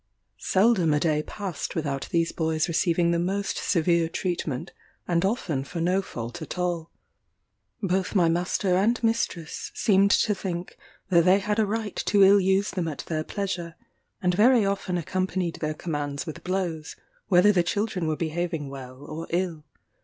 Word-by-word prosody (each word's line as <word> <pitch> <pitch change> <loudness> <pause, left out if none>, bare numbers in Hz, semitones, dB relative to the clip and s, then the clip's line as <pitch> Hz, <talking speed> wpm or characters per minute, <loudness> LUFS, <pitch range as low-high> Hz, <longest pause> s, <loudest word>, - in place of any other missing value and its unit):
Seldom 185 - +3
a - - +2
day 150 -1 +1
passed 190 0 -5
without 140 -5 -2
these 165 -1 +1
boys 160 -1 0
receiving 170 0 +2
the 170 - +1
most 195 +3 -1
severe 170 -1 +2
treatment, 170 -3 -3 0.4
and 170 0 +1
often 185 - -1
for 170 +5 -6
no 180 +3 +2
fault 120 -10 -7
at - - -6
all. 175 -2 -2 0.9
Both 190 +1 0
my 175 -4 +5
master 180 +2 +1
and 220 +6 +3
mistress 225 -8 -1
seemed 200 -1 +4
to 210 - +3
think 180 -3 -5 0.3
that 170 -3 +4
they 185 +1 +6
had 210 +2 -1
a 215 - +3
right 220 0 -3
to 200 -1 +5
ill 200 +1 +7
use 190 +2 +2
them 180 -3 -2
at 155 - -5
their 155 -2 -2
pleasure; 175 -3 -4 0.5
and 180 0 +3
very 225 +3 +5
often 195 -2 -1
accompanied 185 +1 -2
their 155 -1 -2
commands 145 -3 -3
with 155 - -7
blows, 175 -5 -3 0.3
whether 190 +2 +6
the 185 -4 +3
children 190 -1 -1
were 155 -1 -1
behaving 165 -2 -2
well 130 0 -9
or 155 +3 -7
ill. 170 -3 -2
175 Hz, 165 wpm, -26 LUFS, 160-195 Hz, 0.9 s, ill